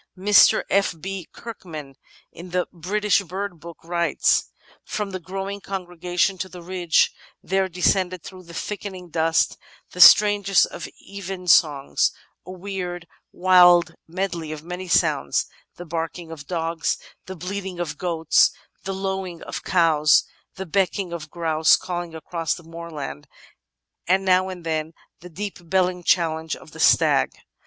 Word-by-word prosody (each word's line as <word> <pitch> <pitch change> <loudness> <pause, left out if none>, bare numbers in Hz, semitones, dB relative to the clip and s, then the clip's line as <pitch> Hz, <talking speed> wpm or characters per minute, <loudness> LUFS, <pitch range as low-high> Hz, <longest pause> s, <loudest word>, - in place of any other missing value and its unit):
Mr. 200 +2 +5
F. 195 -2 +2
B. 190 0 -6
Kirkman, 160 -11 -9 0.4
in 175 +2 -11
The 180 0 0
British 200 +4 +1
Bird 190 -1 -5
Book, 170 +1 -10
writes: 170 0 +1 0.4
"From 210 -2 -4
the 185 - -4
growing 195 +3 -5
congregation 180 0 -2
on 190 - -13
the 180 -2 -11
ridge 175 -2 +2 0.3
there 190 0 0
descended 185 0 +1
through 185 -1 -11
the 170 - -12
thickening 190 -3 -6
dusk 160 0 +2 0.4
the 180 - -2
strangest 205 -1 +7
of 170 - -8 0.2
evensongs 180 -7 +2 0.2
— - - -45
a - - -7
weird, 180 -2 -5 0.3
wild 175 -2 +5
medley 170 -2 -3
of 155 -1 -7
many 180 +2 -6
sounds: 170 - +2 0.3
the 175 - -9
barking 165 +1 -5
of 145 -3 -9
dogs, 165 -2 -1 0.3
the 190 - -6
bleating 185 +1 -5
of 175 -3 -4
goats, 165 -3 +3 0.4
the 195 0 -3
lowing 190 -3 -4
of - - -6
cows, 160 -4 +4 0.3
the 190 - -6
becking 190 0 0
of 155 -2 -6
grouse 160 -1 +3
calling 175 -2 -5
across 165 0 -3
the 170 - -12
moorland, 165 - -7 0.8
and 190 +2 +2
now 185 0 +3
and 180 -2 -8
then 160 0 -2 0.3
the 180 - -11
deep 200 +4 -6
belling 180 -1 +1
challenge 160 -2 +1
of - - -15
the - - -12
stag." - - +4
180 Hz, 145 wpm, -23 LUFS, 165-190 Hz, 0.8 s, strangest